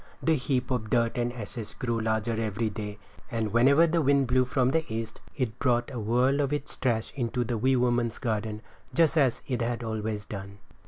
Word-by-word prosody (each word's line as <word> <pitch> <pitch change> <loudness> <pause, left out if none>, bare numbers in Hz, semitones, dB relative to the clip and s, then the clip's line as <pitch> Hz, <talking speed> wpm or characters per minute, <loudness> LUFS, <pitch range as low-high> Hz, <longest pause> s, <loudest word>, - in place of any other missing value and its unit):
The 165 - +4
heap 130 -1 -1
of 110 -4 -1
dirt 115 0 +2
and 120 0 0
ashes 115 -2 -7
grew 120 -2 -1
larger 110 +1 0
every 110 0 -1
day; 105 -1 -5 0.3
and 110 -3 -2
whenever 140 +7 +6
the 165 0 +1
wind 140 -1 +3
blew 125 +1 +3
from 130 0 +1
the 160 +2 +2
east 115 0 -4
it 125 -6 -2
brought 120 0 +1
a 120 - -3
whirl 125 +6 +2
of 140 -1 +1
its 145 0 -3
trash 115 -4 0
into 125 -1 -1
the 120 +1 -2
wee 130 +4 +2
woman's 120 -2 +1
garden 110 -2 -2 0.3
just 165 -1 +4
as 135 -6 +2
it 125 -3 -1
had 120 +1 -1
always 110 -2 -3
done. 100 -1 -7
120 Hz, 200 wpm, -28 LUFS, 110-130 Hz, 0.3 s, whenever